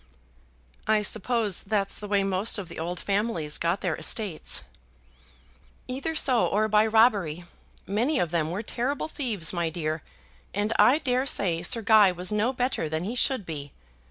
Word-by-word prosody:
"I 215 -1 +3
suppose 220 -1 0
that's 200 -1 -1
the 210 - -7
way 200 -1 +1
most 195 +3 0
of 195 -4 -6
the - - -8
old 175 +2 -4
families 195 -7 -1
got 170 +3 0
their 175 -4 -1
estates." 200 -8 +1 1.2
"Either 275 +6 -4
so, 255 -6 +3
or 215 +2 +1
by 215 +1 +3
robbery. 205 -8 +2 0.4
Many 240 +10 0
of 175 -10 0
them 160 -3 0
were 190 +6 -4
terrible 260 +7 -2
thieves, 225 - -1
my 170 -2 -1
dear, 155 -1 -3 0.5
and 205 +2 0
I 265 - +6
dare 260 -3 -1
say 175 -9 +1
Sir 230 +6 +1
Guy 210 -3 +6
was 180 +1 -4
no 210 +4 +1
better 250 -10 -2
than 160 +2 -2
he 210 +6 -3
should 250 -4 0
be. 145 -4 -7
205 Hz, 165 wpm, -26 LUFS, 175-235 Hz, 1.2 s, I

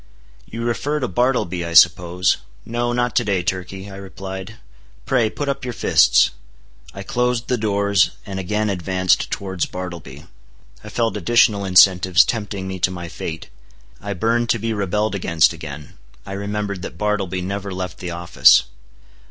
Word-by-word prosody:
"You 115 +1 -6
refer 140 +6 -1
to 130 - -1
Bartleby, 95 -5 0
I 85 0 -5
suppose. 90 +2 +4 0.3
No, 120 +1 -2
not 120 -1 -1
to 120 - +3
day, 100 -4 0
Turkey," 95 +2 -4
I 95 -1 -9
replied; 95 +1 -8 0.5
"pray, 120 -4 +2
put 145 +6 -5
up 140 -1 -2
your 125 -2 -4
fists." - - +4 0.6
I - - -8
closed 125 -1 -1
the 125 - +1
doors, 100 -2 +2 0.2
and 95 -2 -5
again 105 +3 -1
advanced 95 -1 0
towards 95 -3 -3
Bartleby. 85 -6 -8 0.6
I - - -9
felt 115 -2 -1
additional 105 0 +3
incentives 95 0 +5
tempting 105 -4 -4
me 95 0 -5
to 90 - +2
my 90 -2 -7
fate. 80 0 -7 0.5
I 100 0 -4
burned 115 +4 0
to - - +3
be 115 +1 -2
rebelled 105 +1 -1
against 85 -4 +2
again. 75 -4 -10 0.3
I - - -8
remembered 100 -1 -4
that - - -8
Bartleby 100 -4 -1
never 100 +1 -4
left 90 -2 -5
the 90 - -5
office. 85 0 +4
100 Hz, 160 wpm, -20 LUFS, 90-110 Hz, 0.6 s, incentives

